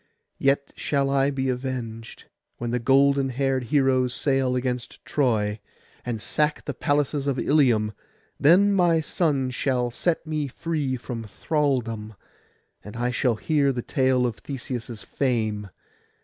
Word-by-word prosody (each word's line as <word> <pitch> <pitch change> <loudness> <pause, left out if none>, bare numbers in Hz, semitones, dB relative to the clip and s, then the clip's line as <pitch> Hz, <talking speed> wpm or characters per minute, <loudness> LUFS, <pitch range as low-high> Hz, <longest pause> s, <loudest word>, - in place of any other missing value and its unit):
Yet 140 0 +1
shall 140 -2 0
I 140 0 +3
be 135 -1 -2
avenged, 125 -3 -5 0.3
when 120 0 -3
the 125 - 0
golden 135 +2 +3
haired 130 0 0
heroes 130 -2 +2
sail 135 -2 +1
against 125 -1 -3
Troy, 110 -7 +1 0.4
and 120 -2 -3
sack 150 +7 -1
the 145 - -3
palaces 145 +1 0
of 135 -2 0
Ilium; 120 -8 +3 0.5
then 185 +8 +5
my 175 -4 +4
son 145 -5 0
shall 125 -1 0
set 165 +7 -1
me 155 -2 -2
free 145 -2 -2
from 120 -2 -6
thraldom, 115 -5 -1 0.7
and 105 +2 -10
I 120 +1 0
shall 125 -1 +1
hear 140 +3 +1
the 120 -2 -4
tale 130 -1 +2
of 120 -3 -2
Theseus' 120 -4 -6
fame. 110 -6 -1
130 Hz, 135 wpm, -25 LUFS, 120-140 Hz, 0.7 s, then